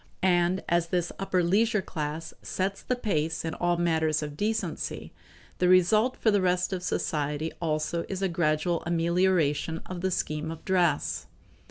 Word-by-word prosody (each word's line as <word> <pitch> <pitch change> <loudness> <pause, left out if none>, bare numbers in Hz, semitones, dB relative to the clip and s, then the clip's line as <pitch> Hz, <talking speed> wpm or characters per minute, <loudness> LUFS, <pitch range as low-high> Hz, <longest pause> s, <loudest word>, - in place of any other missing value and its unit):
And 180 0 +2
as 170 0 +2
this 175 0 -1
upper 185 -2 +1
leisure 210 +3 +2
class 155 0 -4
sets 195 +1 -2
the 250 - -1
pace 160 -9 -1
in 160 - -2
all 175 0 0
matters 160 -2 +1
of 150 -1 -6
decency, 215 +6 -3 0.5
the 180 - +3
result 215 +7 +4
for 220 - +3
the 205 -1 +3
rest 180 +1 +1
of 185 - -2
society 150 -3 -1
also 160 +1 -1
is 195 0 -3
a - - +3
gradual 165 0 0
amelioration 170 -2 +1
of 180 -1 -6
the 190 - +1
scheme 155 -3 -2
of 160 0 -8
dress. 175 -6 +1
175 Hz, 160 wpm, -28 LUFS, 160-185 Hz, 0.5 s, result